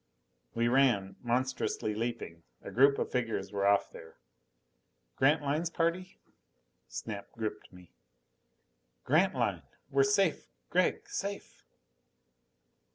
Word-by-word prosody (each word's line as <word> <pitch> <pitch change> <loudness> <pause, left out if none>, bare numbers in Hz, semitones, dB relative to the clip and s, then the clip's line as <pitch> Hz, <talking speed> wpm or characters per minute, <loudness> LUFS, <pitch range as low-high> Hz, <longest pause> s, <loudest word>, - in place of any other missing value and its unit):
We 115 +1 +2
ran, 120 -7 +2
monstrously 125 -3 -1
leaping. 110 -7 -4 0.2
A - - -7
group 140 +3 +5
of - - -2
figures 115 -6 -2
were 100 -1 +1
off 100 0 +3
there. 80 - -12 1.0
Grantline's 150 +3 +2
party? 170 +3 -1 0.7
Snap 105 -3 -6
gripped 110 -2 -5
me. 90 -2 -16 1.1
"Grantline! 175 +8 +2 0.3
We're 415 - +4
safe, 410 0 +2 0.2
Gregg! 430 -2 +1
Safe!" 200 - -5
125 Hz, 95 wpm, -31 LUFS, 105-165 Hz, 1.1 s, group